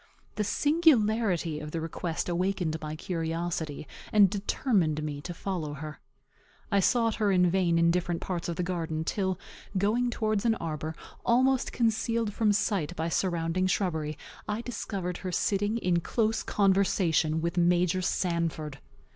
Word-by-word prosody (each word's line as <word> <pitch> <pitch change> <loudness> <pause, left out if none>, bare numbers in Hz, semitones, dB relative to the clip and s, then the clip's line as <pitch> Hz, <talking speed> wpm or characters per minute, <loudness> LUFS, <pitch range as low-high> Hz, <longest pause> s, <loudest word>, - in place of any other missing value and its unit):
The 210 - -1
singularity 220 - +2
of 150 0 -6
the 165 - -3
request 165 +1 -3
awakened 180 -2 0
my 155 0 -4
curiosity, 165 -3 -3 0.2
and 205 -3 +6
determined 195 - 0
me 145 -2 -4
to 175 - -6
follow 170 -4 -4
her. 150 +1 -7 0.7
I 200 - +4
sought 230 +3 +3
her 205 -2 +3
in 180 -2 +4
vain 175 -2 +2
in 170 0 +4
different 175 -1 0
parts 175 -2 -3
of 170 - -2
the 180 - -1
garden, 165 -3 -2
till, 190 +1 -1 0.4
going 225 +6 +2
towards 215 -3 0
an 230 -2 +3
arbor, 155 -2 -4 0.3
almost 260 +2 +3
concealed 230 -1 0
from 215 -1 +2
sight 200 -5 0
by 165 0 -2
surrounding 175 +1 0
shrubbery, 160 -6 -1 0.3
I 210 +2 -1
discovered 195 -7 -4
her 185 - -5
sitting 205 +5 +1
in 180 -6 +1
close 220 +4 0
conversation 185 -5 +2
with 170 +1 -2
Major 175 +1 +3
Sanford! 165 -6 -1
180 Hz, 145 wpm, -28 LUFS, 165-210 Hz, 0.7 s, and